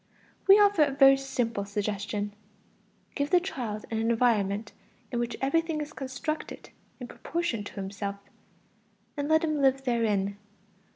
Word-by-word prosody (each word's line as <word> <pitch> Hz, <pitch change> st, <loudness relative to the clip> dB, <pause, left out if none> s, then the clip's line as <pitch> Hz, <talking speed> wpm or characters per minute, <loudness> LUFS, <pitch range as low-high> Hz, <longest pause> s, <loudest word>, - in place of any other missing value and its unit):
We 395 Hz, +1 st, +9 dB
offer 405 Hz, -7 st, +5 dB
a -, -, -2 dB
very 270 Hz, -1 st, +7 dB
simple 245 Hz, -6 st, -2 dB
suggestion: 205 Hz, 0 st, -3 dB, 0.8 s
give 285 Hz, +1 st, -1 dB
the 360 Hz, -, +5 dB
child 240 Hz, -, -5 dB
an 220 Hz, -, -1 dB
environment 225 Hz, -3 st, +1 dB, 0.4 s
in 240 Hz, -, -1 dB
which 240 Hz, -1 st, -2 dB
everything 320 Hz, +3 st, +1 dB
is 300 Hz, 0 st, -5 dB
constructed 290 Hz, +4 st, -5 dB, 0.3 s
in 250 Hz, -, -7 dB
proportion 330 Hz, -7 st, -3 dB
to -, -, -8 dB
himself, 200 Hz, 0 st, -4 dB, 1.0 s
and 290 Hz, 0 st, -3 dB
let 315 Hz, +1 st, +4 dB
him 305 Hz, -2 st, 0 dB
live 270 Hz, 0 st, +3 dB
therein. 210 Hz, -5 st, 0 dB
245 Hz, 135 wpm, -28 LUFS, 210-300 Hz, 1.0 s, We